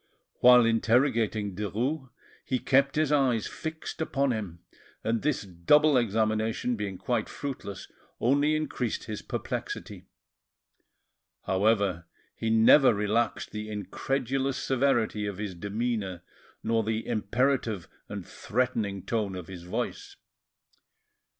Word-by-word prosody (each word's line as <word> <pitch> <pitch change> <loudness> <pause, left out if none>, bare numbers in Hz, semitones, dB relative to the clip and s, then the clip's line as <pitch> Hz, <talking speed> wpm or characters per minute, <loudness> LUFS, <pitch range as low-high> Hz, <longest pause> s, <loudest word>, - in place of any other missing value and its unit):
While 125 -1 +8
interrogating 115 -3 +2
Derues, 120 - -2 0.3
he 130 - 0
kept 135 +2 +2
his 155 -1 +2
eyes 130 -7 +2
fixed 160 0 -6
upon 140 -4 +1
him; 95 -7 -5 0.4
and 115 0 0
this 150 -5 0
double 135 - +4
examination 110 +1 +1
being 100 -3 -4
quite - - -1
fruitless, 125 -8 -6 0.3
only 145 +5 +3
increased 140 -6 -2
his 105 -2 -5
perplexity. - - -5 1.4
However, 95 -3 +1 0.3
he 115 - -2
never 115 +3 +6
relaxed 105 +3 0
the 105 0 -5
incredulous 130 +6 -2
severity 120 -6 +1
of 100 -2 -4
his 100 -2 -4
demeanour, 100 -1 -3 0.4
nor 115 0 +2
the 110 +1 -2
imperative 115 -2 0 0.2
and 100 -3 -6
threatening 110 -5 -2
tone 105 -4 -1
of 90 -2 -6
his 90 -2 -8
voice. 90 - -4
115 Hz, 110 wpm, -28 LUFS, 100-130 Hz, 1.4 s, While